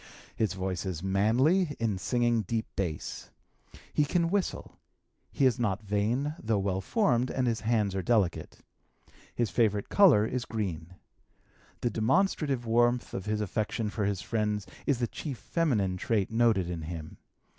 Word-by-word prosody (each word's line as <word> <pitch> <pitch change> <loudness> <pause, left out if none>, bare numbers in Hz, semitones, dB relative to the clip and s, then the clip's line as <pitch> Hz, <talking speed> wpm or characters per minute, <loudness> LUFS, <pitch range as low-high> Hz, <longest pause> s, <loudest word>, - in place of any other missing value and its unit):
His 110 -5 0
voice 95 -1 -3
is 90 -3 -4
manly 130 - +2
(in 110 -5 -1
singing 120 +1 +1
deep 110 +2 -2
base). 85 -6 -4 0.6
He 150 - +3
can 170 +3 +1
whistle. 200 -2 -2 0.5
He 140 - +1
is 130 -1 +3
not 110 -2 -1
vain, 110 +8 0
though 110 -1 0
well 95 -1 -1
formed, 130 - +1
and 130 - 0
his 115 -2 0
hands 110 -3 +1
are 95 - -1
delicate. 100 -5 0 0.7
His 115 -5 0
favorite 105 -3 +1
color 155 - +6
is 125 +1 -3
green. 90 -6 -4 0.9
The 120 - 0
demonstrative 135 - +1
warmth 120 +2 +2
of 95 +2 -5
his 105 0 0
affection 105 +1 -2
for 105 -1 -1
his 100 -2 -1
friends 105 -1 -1 0.2
is 140 - +3
the 120 - 0
chief 135 +2 -6
feminine 105 - 0
trait 105 +1 0
noted 110 -5 +3
in 85 -2 -4
him. 80 -1 -7
110 Hz, 155 wpm, -29 LUFS, 95-125 Hz, 0.9 s, color